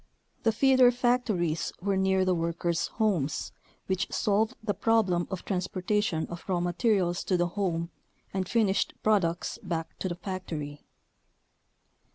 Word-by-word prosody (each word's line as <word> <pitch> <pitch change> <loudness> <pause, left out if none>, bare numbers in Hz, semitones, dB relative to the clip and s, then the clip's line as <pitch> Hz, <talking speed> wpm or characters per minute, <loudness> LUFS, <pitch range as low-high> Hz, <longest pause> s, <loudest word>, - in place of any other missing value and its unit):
The 225 - +3
feeder 260 +2 +5
factories 240 -10 +1
were 195 +2 0
near 190 0 +2
the 185 - +3
workers' 170 0 -1
homes, 185 - -1 0.3
which 190 -1 -1
solved 220 +3 +1
the 205 - 0
problem 195 -4 +2
of 190 -3 -5
transportation 185 -2 0
of 170 0 -8
raw 180 -2 +2
materials 175 0 +1
to 185 - +2
the 175 0 +1
home 170 -3 -2 0.4
and 190 -1 -2
finished 210 -4 +1
products 185 -6 +1
back 165 -2 -4
to 185 - -2
the 175 - -3
factory. 170 -6 -5
185 Hz, 135 wpm, -28 LUFS, 175-210 Hz, 0.4 s, feeder